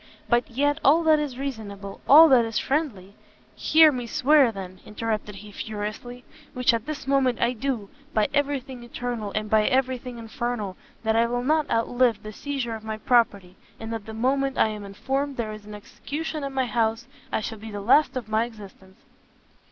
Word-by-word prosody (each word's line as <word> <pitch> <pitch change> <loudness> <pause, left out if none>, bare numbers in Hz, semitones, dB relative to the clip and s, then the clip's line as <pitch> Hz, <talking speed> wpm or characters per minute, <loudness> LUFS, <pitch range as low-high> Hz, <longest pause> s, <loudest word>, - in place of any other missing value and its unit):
but 240 0 +2
yet, 285 +5 0
all 315 +5 +5
that 315 -1 +5
is 285 -4 -4
reasonable, 210 -7 -6
all 315 +4 +10
that 260 -5 +5
is 225 -1 -3
friendly 255 - -2 0.3
" - - -32
"Hear 315 -1 +8
me 245 -3 -4
swear, 275 +1 +4
then!" 185 -3 -8
interrupted 210 -1 -4
he, 205 +1 -11
furiously, 215 +4 -6 0.3
"which 250 -1 +3
at 230 +3 -2
this 305 -1 -5
moment 270 -3 +2
I 235 +1 +2
do, 245 -4 -3 0.2
by 215 -6 +2
every 285 -1 +1
thing 255 -1 -10
eternal, 240 -3 -4
and 215 0 -1
by 215 0 +3
every 260 -1 +1
thing 250 -1 -8
infernal, 225 -3 -4 0.3
that 220 0 +1
I 230 +1 +3
will 245 +1 -2
not 305 +2 +1
outlive 230 -1 +1
the 215 0 -8
seizure 270 -2 -4
of 220 -1 -7
my 220 0 -4
property, 205 -6 +1 0.2
and 225 0 -5
that 225 -2 -6
the 220 - -7
moment 270 +3 0
I - - +4
am 210 -1 -6
informed 270 +8 -3
there 220 -3 -3
is 215 -1 -11
an 210 - -8
execution 300 +8 -6
in 275 - -3
my 265 -1 0
house, 230 -1 0 0.4
shall 220 0 -6
be 220 +1 -8
the 205 -1 -6
last 255 +7 +3
of 240 -4 -5
my 220 +1 +1
existence!" 195 -4 -13
235 Hz, 195 wpm, -25 LUFS, 215-270 Hz, 0.4 s, all